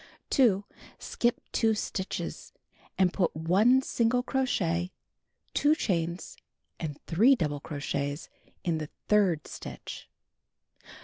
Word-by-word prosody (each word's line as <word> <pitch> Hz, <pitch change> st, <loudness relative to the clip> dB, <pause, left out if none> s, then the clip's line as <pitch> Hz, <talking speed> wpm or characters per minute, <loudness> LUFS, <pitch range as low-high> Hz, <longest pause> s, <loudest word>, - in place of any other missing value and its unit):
2. 210 Hz, -7 st, +4 dB, 0.3 s
Skip 240 Hz, 0 st, 0 dB
2 225 Hz, -1 st, +2 dB
stitches, 190 Hz, -2 st, -4 dB, 0.4 s
and 185 Hz, -2 st, +3 dB
put 180 Hz, -6 st, +1 dB
1 200 Hz, +12 st, +4 dB
single 245 Hz, +1 st, +1 dB
crochet, 185 Hz, -10 st, 0 dB, 0.6 s
2 295 Hz, +1 st, +4 dB
chains, 170 Hz, -, -2 dB, 0.4 s
and 150 Hz, -3 st, -4 dB
3 225 Hz, +11 st, +5 dB
double 150 Hz, -, -1 dB
crochets 145 Hz, 0 st, -3 dB, 0.4 s
in 165 Hz, -3 st, 0 dB
the 155 Hz, -1 st, -5 dB, 0.2 s
third 190 Hz, -7 st, +3 dB
stitch. -, -, -8 dB
185 Hz, 105 wpm, -29 LUFS, 160-230 Hz, 0.6 s, 3